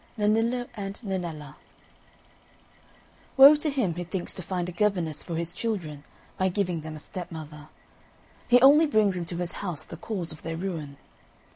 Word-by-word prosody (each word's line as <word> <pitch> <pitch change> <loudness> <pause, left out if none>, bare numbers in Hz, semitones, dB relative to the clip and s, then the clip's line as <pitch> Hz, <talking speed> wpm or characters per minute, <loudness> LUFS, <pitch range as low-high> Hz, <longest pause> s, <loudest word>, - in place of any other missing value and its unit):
XXX - - -6
NENNILLO 230 +3 +1
AND 200 -2 -6
NENNELLA 165 -8 -5 1.8
Woe 275 +3 +10
to 300 +1 0
him 255 - 0
who 175 +2 -4
thinks 175 +1 -4
to - - -6
find 180 0 -3
a - - -4
governess 175 -5 0
for 170 - -5
his 170 +1 -2
children 170 -10 -4 0.4
by 190 0 +2
giving 180 -3 -1
them 155 0 -7
a - - -7
stepmother! 155 -3 -8 0.8
He 245 - +6
only 295 +4 +7
brings 215 -8 +3
into 170 -1 -4
his 175 0 -2
house 175 -6 -4
the 165 - -9
cause 175 -2 -4
of 155 - -11
their 165 0 -4
ruin. 165 -6 -5
180 Hz, 165 wpm, -27 LUFS, 165-210 Hz, 1.8 s, Woe